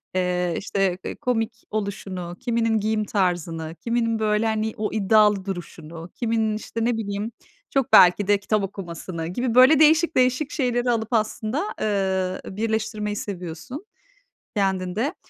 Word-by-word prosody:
eee, 180 -2 0
işte, 195 -2 0
eee, - - -4
komik 225 -2 -2
oluşunu, 190 -4 -4
kiminin 230 -2 +1
giyim 215 +1 0
tarzını, 170 -5 -1
kiminin 230 -1 0
böyle 215 0 +1
hani 220 0 0
o 210 - -2
iddialı 210 -1 +3
duruşunu, 170 -2 -7
kiminin 225 -2 0
işte 230 +1 -4
ne 240 -1 +1
bileyim 205 0 -3 0.4
çok 270 -3 0
belki 185 +2 +7
de 205 - +4
kitap 210 0 0
okumasını 170 -3 -6
gibi 240 +6 -2
böyle 260 +4 +7
değişik 320 +2 +5
değişik 255 +3 +2
şeyleri 245 -3 0
alıp 225 0 -2
aslında, 220 - 0 0.2
ııı, 190 -3 0 0.2
birleştirmeyi 220 -1 -2
seviyorsun 195 - -6 0.7
kendinde. 195 - 0
215 Hz, 135 wpm, -23 LUFS, 185-230 Hz, 0.7 s, belki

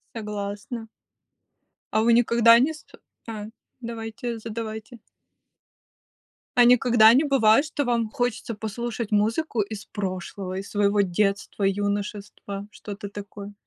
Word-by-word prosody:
Согласна. 210 +1 -5 1.1
А 220 - +3
вы 235 +1 +4
никогда 235 0 +6
не 285 +6 +2
ст 310 - -16 0.4
А, 215 -2 -5 0.3
давайте, 230 0 -5
задавайте. 220 +1 -6 1.6
А 245 - +8
никогда 240 -2 +6
не 270 +5 +4
бывает, 270 -3 +4
что 295 -2 -2
вам 235 -2 0
хочется 240 -1 -2
послушать 225 +1 -4
музыку 225 +5 +1
из 210 0 -6
прошлого, 185 -1 -5
из 195 +1 -7
своего 205 0 +2
детства, 200 +2 -1
юношества, 200 0 -2
что-то 205 -1 -8
такое? 205 0 -9
220 Hz, 115 wpm, -25 LUFS, 205-235 Hz, 1.6 s, А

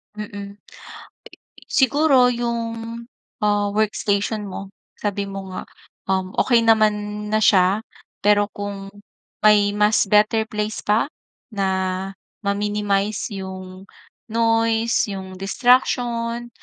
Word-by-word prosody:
Mm. - - -11
Eh 210 - -5
eh, 200 0 -6 1.2
siguro 270 -1 +4
‘yong, 230 -1 -4 0.4
ah, 205 -1 +2
workstation 210 0 -1
mo, 195 +1 -8 0.2
sabi 200 -1 -3
mo 195 0 -6
nga, 185 - -4 0.5
um, 190 -1 0
okey 235 -2 +3
naman 210 -1 +2
na 215 - +2
siya. 200 0 +3 0.4
Pero 205 0 +4
kung 200 -1 -6 0.6
may 210 -1 +6
mas 210 -1 +3
better 215 +2 +3
place 210 0 -3
pa 210 +2 +2 0.5
na 200 -2 0 0.8
ma-minimize 205 +1 -1
‘yong 190 -1 -8 0.4
noise, 230 0 +1
‘yong 190 -1 -7
distraction, 240 +2 +1
210 Hz, 105 wpm, -21 LUFS, 200-230 Hz, 1.2 s, may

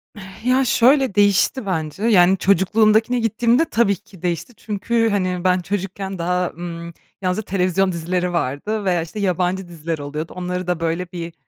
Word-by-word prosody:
Eee, 205 - -10 0.2
ya, 255 +2 +3
şöyle, 255 -1 +3
değişti 205 +4 +3
bence, 160 0 -3
yani, 190 -4 +5
çocukluğumdakine 215 +6 +3
gittiğimde 235 +5 +2
tabii 225 -8 +2
ki 190 -2 -18
değişti. 175 +6 -3
Çünkü, 225 +2 0
hani, 185 -3 -1
ben 185 0 +3
çocukken 190 +1 -4
daha, 180 +1 0
ımm, 170 0 -7 0.3
yalnızca 185 +3 -1
televizyon 185 0 +1
dizileri 175 +1 -2
vardı 170 +8 -2
veya, 180 -3 +2
işte, 165 +6 -7
yabancı 185 -1 0
diziler 165 -1 -4
oluyordu. 150 +3 -5
Onları 180 0 -4
da, 180 -2 -1
böyle, 170 +2 -2
bir, 170 -1 -6
185 Hz, 155 wpm, -20 LUFS, 175-210 Hz, 0.3 s, yani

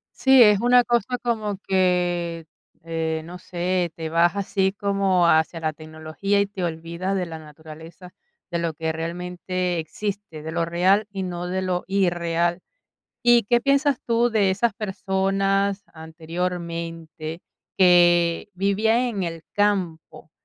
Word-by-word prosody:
Sí, 265 -2 +6
es 210 -2 +5
una 245 +1 +5
cosa 240 +1 0
como 215 -4 -2
que, 175 -3 0 0.4
eh, 160 -1 -2
no 180 +2 -9
sé, 180 -1 -2
te 160 -1 -5
vas 170 +2 +3
así 195 -1 0
como 195 -3 +1
hacia 160 +1 +2
la 155 -1 -2
tecnología 160 +6 -3
y 200 - +3
te 195 -2 -6
olvidas 170 +3 -3
de 180 - -1
la 165 -1 -8
naturaleza, 160 +3 -13 0.4
de 170 - -1
lo 165 -2 -2
que 160 +1 -2
realmente 180 +2 -3
existe, 195 -1 -6
de 160 - -5
lo 170 0 0
real 185 +5 +2
y 195 -1 -4
no 175 -1 -4
de 185 +1 -2
lo 180 -1 -1
irreal. 175 -2 0 0.6
¿Y 240 -1 +5
qué 240 +3 +2
piensas 280 0 +2
tú 235 +1 +2
de 210 -4 +2
esas 210 +3 0
personas 195 0 0
anteriormente 165 0 -5 0.4
que 175 -1 +4
vivían 200 +4 +1
en 235 -6 -2
el 165 -2 -5
campo 185 -7 -1
180 Hz, 140 wpm, -23 LUFS, 165-200 Hz, 0.6 s, Sí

